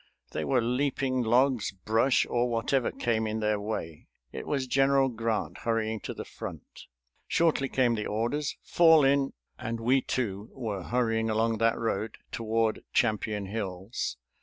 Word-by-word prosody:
They - - -2
were 125 -3 +2
leaping 130 +1 0
logs, 120 0 +2
brush, 110 +7 +2
or 120 0 +1
whatever 120 +2 +1
came 110 -2 -1
in 110 +1 -2
their 105 -1 +1
way. 100 -7 -5 0.2
It - - -7
was 135 -3 0
General 135 +1 +3
Grant, 110 -8 -2
hurrying 110 -1 -1
to - - -6
the - - -6
front. - - -9 0.4
Shortly 155 -5 +2
came 125 -3 +2
the 105 -2 -2
orders, 120 +8 -1
"Fall 160 -4 +6
in!" 135 0 +2 0.3
and 115 0 -3
we 130 +4 +3
too 105 -6 -3
were 110 -7 -4
hurrying 115 +1 0
along 110 0 +1
that 115 0 +3
road 110 -1 -2
toward 115 -1 0
Champion 105 -1 +1
Hills. 95 +1 -4
115 Hz, 150 wpm, -28 LUFS, 110-130 Hz, 0.4 s, Fall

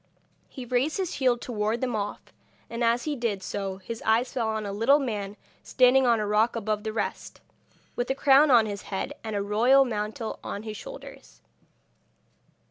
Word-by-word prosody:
He 255 - -8
raised 255 +5 0
his 375 -3 -2
shield 255 -3 +1
to - - -7
ward 215 +1 -1
them 250 -2 -2
off, 205 -1 -5 0.4
and 235 +1 -2
as 235 +1 +2
he 300 -2 -2
did 225 -6 -2
so 195 -1 -4
his 225 +4 -7
eyes 225 +3 +1
fell 235 -3 -1
on 220 -1 -2
a 200 - -4
little 230 +8 +4
man 210 -7 -4 0.2
standing 255 +1 +4
on 235 -2 +3
a 210 - -1
rock 215 +3 +2
above 215 -2 -2
the 220 - -3
rest, 215 -1 -4 0.6
with 245 - -2
a 265 - +1
crown 280 +2 +5
on 235 -4 +6
his 205 -1 -5
head 200 +8 -3
and 220 -2 -4
a 200 - -1
royal 240 +7 +4
mantle 215 -1 -4
on 200 - -5
his 215 -1 -6
shoulders. - - -11
230 Hz, 190 wpm, -26 LUFS, 210-255 Hz, 0.6 s, on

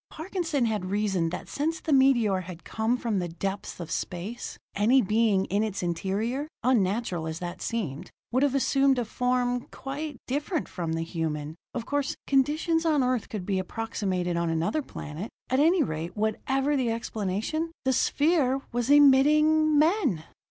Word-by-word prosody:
Parkinson 325 -5 -2
had 210 -5 -1
reasoned 195 -4 0
that 180 - -6
since 320 +3 -2
the 310 - -1
meteor 240 -8 +4
had 180 -1 -9
come 225 +3 0
from 230 -5 -1
the 175 - -2
depths 195 +4 -4
of 165 -2 -6
space, 185 +8 -4 0.2
any 225 +7 +4
being 210 -3 +2
in 200 +2 0
its 210 -4 -2
interior, 205 - -1 0.2
unnatural 205 -7 +1
as 160 0 -4
that 175 0 -6
seemed, 185 -12 -3 0.2
would 255 +2 +2
have 280 -1 +2
assumed 275 0 +3
a 245 - 0
form 245 +1 0
quite 290 +1 -6
different 295 +4 -2
from 170 -3 -3
the 165 0 -1
human. 155 -3 -3 0.2
Of 235 -2 -3
course, 285 -1 -1
conditions 305 +5 +2
on 305 -5 +3
Earth 250 -3 0
could 205 -5 -5
be 195 -1 0
approximated 185 -3 -2
on 170 -1 0
another 165 - 0
planet. 175 - -7 0.2
At 260 - +3
any 330 +3 +4
rate, 165 - -4
whatever 265 +7 0
the 255 -4 +1
explanation, 225 - -2
the 260 - +3
sphere 285 0 +2
was 240 +1 -1
emitting 300 +2 +5
men! 300 - +2
235 Hz, 160 wpm, -27 LUFS, 185-280 Hz, 0.2 s, emitting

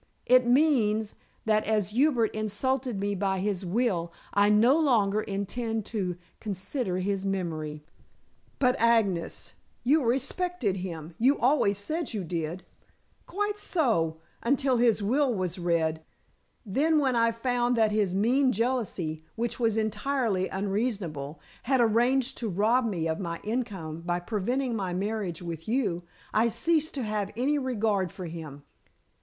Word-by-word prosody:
It 250 -1 +5
means, 240 -6 +3 0.3
that 215 -1 +3
as 210 -3 +1
Hubert 245 -2 +2
insulted 215 +2 -1
me 205 +1 -1
by 195 0 0
his 195 0 -1
will, 180 -3 0 0.2
I 205 0 +4
no 225 +6 +5
longer 215 -9 +3
intend 215 +2 -3
to 185 -5 -1 0.2
consider 200 0 -3
his 195 +1 -1
memory." 160 -6 -3 0.7
"But, 250 -2 +3
Agnes, 225 -7 +1 0.3
you 285 +4 +3
respected 265 - 0
him. 170 -3 -6
You 265 +5 +4
always 245 -6 +3
said 310 +11 -3
that - - -8
you 200 - -2
did?" 170 +1 -4 0.6
"Quite 415 +2 -2
so, 215 - +1 0.2
until 265 +1 +2
his 230 -3 +3
will 260 +6 +2
was 185 -4 -2
read. 165 -2 0 0.6
Then 295 +10 +2
when 270 -4 +2
I 230 0 +3
found 245 +1 0
that 220 -1 +3
his 205 -4 +1
mean 250 +6 +3
jealousy 200 -10 -1
which 235 0 -3
was 225 -2 +1
entirely 220 -2 0
unreasonable 190 - -2 0.2
had 265 +1 +1
arranged 245 +3 +2
to 230 - -2
rob 225 +6 +2
me 170 -6 -1
of 160 0 -2
my 170 -3 -4
income 195 -9 -3
by 175 0 -1
preventing 235 +7 -1
my 185 -4 -2
marriage 195 -3 -3
with 165 -2 -6
you, 215 -8 0 0.3
I 220 +2 +4
ceased 310 +8 0
to 265 - -2
have 210 -2 -2
any 285 +4 +1
regard 215 -8 0
for 185 - -7
him. 155 -4 -8
215 Hz, 145 wpm, -28 LUFS, 185-250 Hz, 0.7 s, It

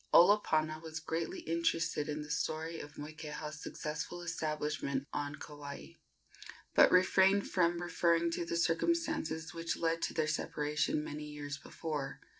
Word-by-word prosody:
Olopana 155 -5 +5
was 160 -1 -5
greatly 160 +1 -3
interested 165 -2 0
in 150 0 -2
the 150 - -7
story 160 +2 -1
of 145 0 -9
Moikeha's 150 0 -6
successful 160 +3 -4
establishment 150 -4 -2
on 145 0 -2
Kauai, 145 - -8 0.8
but - - +7
refrained 190 +2 +5
from 170 -2 +2
referring 170 -1 +2
to 170 - -1
the 170 0 -2
circumstances 170 - 0
which 165 0 -2
led 165 0 0
to - - -1
their 155 - +2
separation 150 0 0
many 150 0 -5
years 145 -1 -6
before. 150 -4 -4
160 Hz, 135 wpm, -34 LUFS, 150-170 Hz, 0.8 s, but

